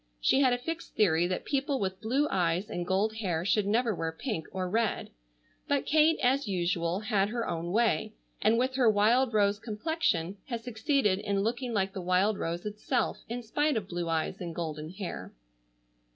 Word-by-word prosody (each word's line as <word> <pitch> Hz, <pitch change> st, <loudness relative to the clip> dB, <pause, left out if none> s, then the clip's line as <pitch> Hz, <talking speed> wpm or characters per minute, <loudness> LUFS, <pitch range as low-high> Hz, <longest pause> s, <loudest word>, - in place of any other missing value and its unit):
She 265 Hz, -, +3 dB
had 260 Hz, -2 st, +4 dB
a 245 Hz, -, +2 dB
fixed 330 Hz, +7 st, -6 dB
theory 175 Hz, -4 st, +3 dB
that 185 Hz, -, -3 dB
people 275 Hz, -1 st, 0 dB
with 190 Hz, 0 st, -3 dB
blue 265 Hz, +7 st, +1 dB
eyes 180 Hz, +1 st, 0 dB
and 175 Hz, 0 st, -3 dB
gold 210 Hz, +4 st, +1 dB
hair 175 Hz, -6 st, -1 dB
should 200 Hz, +1 st, +2 dB
never 230 Hz, +2 st, +2 dB
wear 165 Hz, -3 st, -2 dB
pink 165 Hz, -, -4 dB
or 185 Hz, -1 st, -2 dB
red, 220 Hz, +3 st, -1 dB, 0.6 s
but 285 Hz, -1 st, +1 dB
Kate 315 Hz, +2 st, +4 dB
as 265 Hz, +1 st, +2 dB
usual 175 Hz, -1 st, 0 dB
had 210 Hz, -3 st, +1 dB
her 235 Hz, +1 st, -2 dB
own 170 Hz, 0 st, -3 dB
way, 220 Hz, 0 st, +1 dB, 0.3 s
and 220 Hz, +2 st, +4 dB
with 255 Hz, +2 st, +1 dB
her 245 Hz, -4 st, +5 dB
wild 230 Hz, +5 st, +3 dB
rose 205 Hz, -2 st, +2 dB
complexion 210 Hz, -, -1 dB
had 235 Hz, -3 st, -4 dB
succeeded 225 Hz, -3 st, +1 dB
in 200 Hz, -1 st, -1 dB
looking 240 Hz, +3 st, -2 dB
like 195 Hz, -3 st, 0 dB
the 190 Hz, -, -4 dB
wild 185 Hz, +4 st, +2 dB
rose 170 Hz, +3 st, -3 dB
itself 210 Hz, 0 st, -1 dB
in 240 Hz, +1 st, -4 dB
spite 290 Hz, +4 st, +1 dB
of 200 Hz, -3 st, -3 dB
blue 175 Hz, -2 st, -3 dB
eyes 165 Hz, +4 st, -1 dB
and 170 Hz, -2 st, -5 dB
golden 155 Hz, -2 st, -4 dB
hair. 190 Hz, +1 st, -6 dB
210 Hz, 185 wpm, -29 LUFS, 180-240 Hz, 0.6 s, her